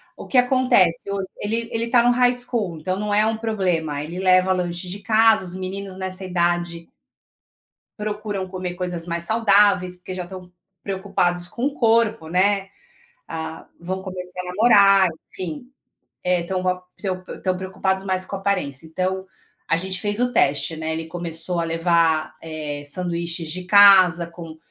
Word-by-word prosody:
O -, -, -10 dB
que 260 Hz, -, 0 dB
acontece 245 Hz, -9 st, +3 dB
hoje, 195 Hz, -1 st, -3 dB
ele 230 Hz, +2 st, -2 dB
ele 230 Hz, +1 st, -2 dB
tá 240 Hz, -1 st, +4 dB
no 245 Hz, -, +4 dB
high 245 Hz, 0 st, +3 dB
school, 230 Hz, -9 st, -2 dB
então 185 Hz, +4 st, -3 dB
não 210 Hz, 0 st, -2 dB
é 210 Hz, +1 st, +4 dB
um 220 Hz, 0 st, 0 dB
problema. 180 Hz, -10 st, -1 dB
Ele 170 Hz, +4 st, -6 dB
leva 185 Hz, 0 st, +4 dB
lanche 180 Hz, 0 st, -2 dB
de 200 Hz, +3 st, -6 dB
casa, 220 Hz, -2 st, +3 dB
os 180 Hz, +1 st, -5 dB
meninos 190 Hz, 0 st, -6 dB
nessa 190 Hz, 0 st, -4 dB
idade 175 Hz, -1 st, -1 dB, 1.1 s
procuram 210 Hz, -2 st, -4 dB
comer 185 Hz, -1 st, -5 dB
coisas 175 Hz, -2 st, -4 dB
mais 170 Hz, 0 st, -2 dB
saudáveis, 200 Hz, -4 st, +3 dB
porque 185 Hz, +1 st, -8 dB
já 180 Hz, -, -4 dB
estão 180 Hz, 0 st, -10 dB, 0.3 s
preocupados 185 Hz, -3 st, -1 dB
com 245 Hz, +7 st, -3 dB
o 285 Hz, -, 0 dB
corpo, 225 Hz, -, +2 dB
né. 195 Hz, +2 st, +2 dB, 0.6 s
Ah, 160 Hz, 0 st, -6 dB
vão 185 Hz, +2 st, -4 dB
começar 180 Hz, -1 st, -6 dB
a 180 Hz, -, -10 dB
namorar, 195 Hz, -1 st, +5 dB, 0.2 s
enfim. 185 Hz, -, -7 dB, 0.5 s
É, 180 Hz, -1 st, +1 dB
estão 185 Hz, +1 st, -3 dB
com 185 Hz, -, 0 dB
a 180 Hz, 0 st, 0 dB, 0.2 s
estão 185 Hz, -2 st, -4 dB
p -, -, -9 dB
estão 185 Hz, -1 st, -1 dB
preocupados 190 Hz, +1 st, -2 dB
mais 185 Hz, -1 st, 0 dB
com 195 Hz, -, -5 dB
a -, -, -5 dB
aparência. 180 Hz, -7 st, -2 dB
Então, 185 Hz, +3 st, -3 dB, 0.4 s
a 165 Hz, -, +3 dB
gente 185 Hz, +1 st, -3 dB
fez 205 Hz, +2 st, -1 dB
o 245 Hz, 0 st, +1 dB
teste, 145 Hz, -, +2 dB
né, 160 Hz, 0 st, -3 dB
ele 160 Hz, 0 st, -4 dB
começou 170 Hz, 0 st, -2 dB
a 165 Hz, -, -1 dB
levar, 165 Hz, -2 st, +1 dB
eh, 150 Hz, -2 st, -6 dB
sanduíches 170 Hz, 0 st, -2 dB
de 180 Hz, +2 st, -5 dB
casa 185 Hz, -4 st, +7 dB
com 165 Hz, -2 st, -10 dB
185 Hz, 170 wpm, -22 LUFS, 170-200 Hz, 1.1 s, casa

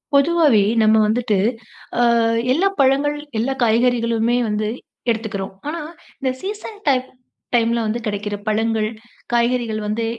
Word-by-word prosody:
பொதுவாவே 290 Hz, -7 st, +4 dB, 0.2 s
நம்ம 220 Hz, 0 st, +5 dB
வந்துட்டு 220 Hz, -1 st, +1 dB, 0.6 s
அ -, -, +5 dB, 0.5 s
எல்லா 365 Hz, +8 st, +2 dB
பழங்கள், 280 Hz, +2 st, +2 dB, 0.2 s
எல்லா 260 Hz, +4 st, 0 dB
காய்கறிகளுமே 235 Hz, 0 st, +2 dB
வந்து 210 Hz, 0 st, -1 dB, 0.4 s
எடுத்துக்கிறோம். 215 Hz, -4 st, -2 dB
ஆனா 325 Hz, +2 st, -3 dB, 0.4 s
இந்த 260 Hz, -1 st, 0 dB
சீசன் 420 Hz, +2 st, -6 dB
டைம் 260 Hz, -1 st, +1 dB, 0.5 s
டைம்ல 235 Hz, 0 st, +2 dB
வந்து 220 Hz, +2 st, -1 dB
கிடைக்கிற 205 Hz, 0 st, -3 dB
பழங்கள், 220 Hz, 0 st, +1 dB, 0.4 s
காய்கறிகள் 235 Hz, -2 st, +1 dB
வந்து 220 Hz, +2 st, -1 dB
235 Hz, 120 wpm, -20 LUFS, 215-270 Hz, 0.6 s, நம்ம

